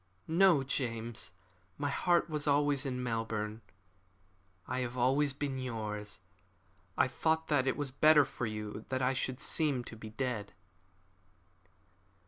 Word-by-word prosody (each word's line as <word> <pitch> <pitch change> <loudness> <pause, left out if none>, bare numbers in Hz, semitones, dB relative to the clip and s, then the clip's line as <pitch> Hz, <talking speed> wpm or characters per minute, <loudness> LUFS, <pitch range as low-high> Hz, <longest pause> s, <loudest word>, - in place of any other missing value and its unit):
"No, 165 -3 +5
James, 115 -5 -3 0.5
my 145 0 -1
heart 175 +3 +2
was 150 -2 -2
always 145 -1 +3
in 125 -1 -3
Melbourne. 115 -2 -2 1.1
I 130 +1 -2
have 125 0 -3
always 135 +4 +3
been 135 -1 -3
yours. 105 -5 -4 0.8
I - - +4
thought 160 +4 0
that 140 -3 +2
it 130 - +1
was 145 -3 -2
better 150 +1 +6
for 120 - -4
you 105 0 -5
that 130 0 -1
I 130 +1 +3
should 130 -1 -2
seem 145 -6 +1
to 115 - -9
be 110 0 -9
dead." 110 -3 -3
130 Hz, 135 wpm, -33 LUFS, 115-145 Hz, 1.1 s, better